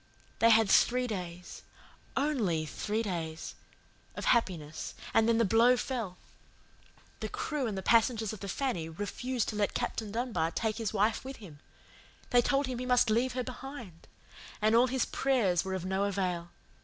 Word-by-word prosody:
They 230 - +6
had 225 -1 +6
three 250 +5 +4
days 180 -5 -6 0.6
ONLY 225 - +1
three 215 +7 -2
days 165 -5 -4 0.6
of - - -5
happiness, 165 -10 0 0.2
and 225 +1 +4
then 230 - +4
the 230 - +3
blow 235 +5 +5
fell. 230 -9 -3 1.0
The - - -4
crew 315 - -2
and 205 -3 -3
the 190 - -4
passengers 225 -1 +3
of 215 - -8
the 200 - -6
Fanny 190 - -2
refused 225 +8 -3
to 215 - -4
let 205 -1 0
Captain 215 -2 -2
Dunbar 220 -8 -1
take 220 +5 -2
his 225 -3 -2
wife 215 +1 +1
with 265 +1 -7
him. 175 - -12 0.7
They 245 -1 +6
told 275 +3 +1
him 255 -2 -4
he 250 - -3
must 245 -3 +4
leave 245 +3 +2
her 255 0 -2
behind. 245 - -9 0.5
And 215 +1 +3
all 240 +2 +6
his 260 0 0
prayers 225 -11 +1
were 190 0 -3
of 185 -1 -4
no 190 +1 0
avail. 180 -4 -2
220 Hz, 170 wpm, -31 LUFS, 190-250 Hz, 1.0 s, They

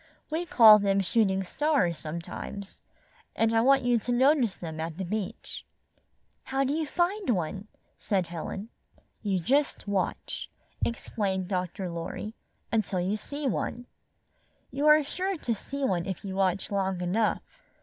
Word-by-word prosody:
We 335 +3 -1
call 220 -7 +9
them 200 -1 +2
shooting 195 -1 +2
stars 190 - +1
sometimes, 170 +5 -6 0.5
and 225 0 +2
I 225 - +5
want 270 +2 +5
you 245 -1 +3
to 245 - -3
notice 255 -3 +3
them 160 -2 -6
at 160 0 -4
the 190 - -3
beach." 205 +1 -5 0.8
"How 270 +1 0
do 275 +1 0
you 315 0 -1
find 355 +3 0
one?" 195 0 -1 0.3
asked 195 -4 0
Helen. 190 +5 -5 0.5
38 210 - -4
"You 190 - +2
just 275 - +1
watch," 200 -2 -2 0.3
explained 195 -5 -1
Dr. 185 0 -2
Lorry, 170 +5 -5 0.4
"until 210 -4 0
you 185 +4 0
see 285 +7 -5
one. 245 -1 -2 0.9
You 290 +2 0
are 305 0 +7
sure 370 +6 -2
to 240 -6 -1
see 280 +6 -5
one 180 -6 0
if 190 +1 -5
you 190 - -4
watch 190 0 0
long 190 -2 0
enough. 195 +5 -1
210 Hz, 150 wpm, -28 LUFS, 185-265 Hz, 0.9 s, call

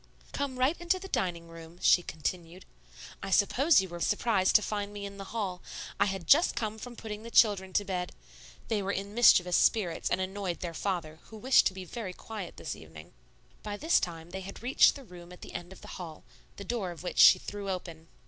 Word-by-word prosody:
"Come 280 -2 -3
right 260 +6 +2
into 350 +2 +1
the 385 +1 -8
dining 170 - -2
room," 165 0 -12
she 180 - +5
continued. 170 +2 -5 0.6
"I 195 - -5
suppose 255 - +4
you 190 - -6
were 175 0 -7
surprised 205 0 +1
to 210 - +6
find 205 -1 -3
me 205 -1 -6
in 200 0 -8
the 195 - -7
hall; 195 -5 -4 0.4
I - - +5
had 190 -3 -3
just 320 - +5
come 220 -1 -3
from 245 +2 -8
putting 215 -2 -7
the 230 - -9
children 200 -5 +4
to 205 - +1
bed. 180 -2 -3 0.6
They 215 -2 0
were 195 0 -2
in 200 +1 -4
mischievous 180 -6 +5
spirits 180 -7 +1
and 180 - 0
annoyed 190 -1 -3
their 175 -2 -4
father, 165 -4 -3
who 220 - -12
wished 255 +5 +4
to 190 - -3
be 190 -1 -7
very 200 -1 -6
quiet 210 -2 -8
this 155 - -5
evening." 80 +1 -13 0.5
By 205 -1 -5
this 320 +9 +3
time 165 -1 -6
they 190 - -5
had 195 +4 -9
reached 255 +3 +5
the 280 - -10
room 175 -5 -13
at 180 - -13
the - - -10
end 175 +1 -7
of 190 - -13
the - - -12
hall, 165 -3 -8 0.3
the 200 - -8
door 205 -3 -3
of 170 -1 -9
which 180 - -4
she - - +9
threw 200 +1 -6
open. 170 -3 -6
190 Hz, 220 wpm, -29 LUFS, 175-220 Hz, 0.6 s, she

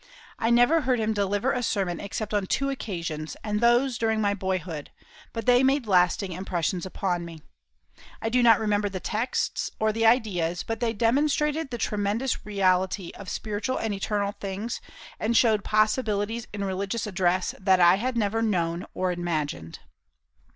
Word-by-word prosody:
I 225 - +1
never 245 +7 +5
heard 255 -3 +1
him 220 0 0
deliver 205 +5 0
a 250 - -1
sermon 190 -7 -1
except 210 +1 -5
on 205 -2 0
two 275 +6 0
occasions, 170 - -5
and 210 0 -1
those 240 +1 +3
during 220 -1 +1
my 205 -1 +2
boyhood; 185 -6 -3 0.4
but 230 - -5
they 245 0 +5
made 270 -1 +2
lasting 185 0 +2
impressions 180 0 -2
upon 180 -2 -2
me. 165 -2 -10 0.8
I 225 - -2
do 250 +2 +2
not 230 -2 +6
remember 210 -1 +1
the 190 -1 -5
texts 220 +7 -2
or 220 0 +2
the 225 +1 +2
ideas, 180 -8 +1
but 225 -1 -4
they 235 -1 0
demonstrated 290 +6 +1
the 240 - -4
tremendous 210 +3 -1
reality 190 -2 +1
of 200 - -9
spiritual 215 +4 -3
and 220 -2 -2
eternal 200 0 -1
things, 200 +3 -5 0.4
and 230 +1 +1
showed 220 -4 +4
possibilities 215 0 0
in 200 -1 -4
religious 195 +3 -2
address 185 -2 0
that 190 -1 +3
I 175 +1 +6
had 250 +3 -2
never 220 0 0
known 175 -5 -1
or 185 0 0
imagined. 155 - -3
205 Hz, 165 wpm, -26 LUFS, 185-230 Hz, 0.8 s, not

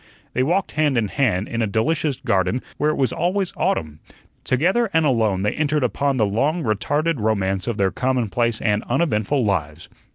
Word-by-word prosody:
They 125 - +1
walked 175 +8 0
hand 150 -4 +1
in 110 -3 +1
hand 110 -8 0
in 115 -1 -3
a 110 - +1
delicious 145 +7 0
garden 95 +3 0
where 150 - +1
it 155 - 0
was 135 -2 0
always 185 +2 -1
autumn; 80 - -1 0.4
together 190 - +1
and 160 -1 +3
alone 110 -8 +1
they 105 - +1
entered 150 -2 0
upon 135 +2 0
the 110 - +3
long 140 - 0
retarded 145 +7 0
romance 95 -3 0
of 120 -3 -2
their 95 -1 +1
commonplace 120 -3 0
and 105 -1 +1
uneventful 130 -2 +1
lives. 85 -4 -2
125 Hz, 175 wpm, -21 LUFS, 105-150 Hz, 0.4 s, and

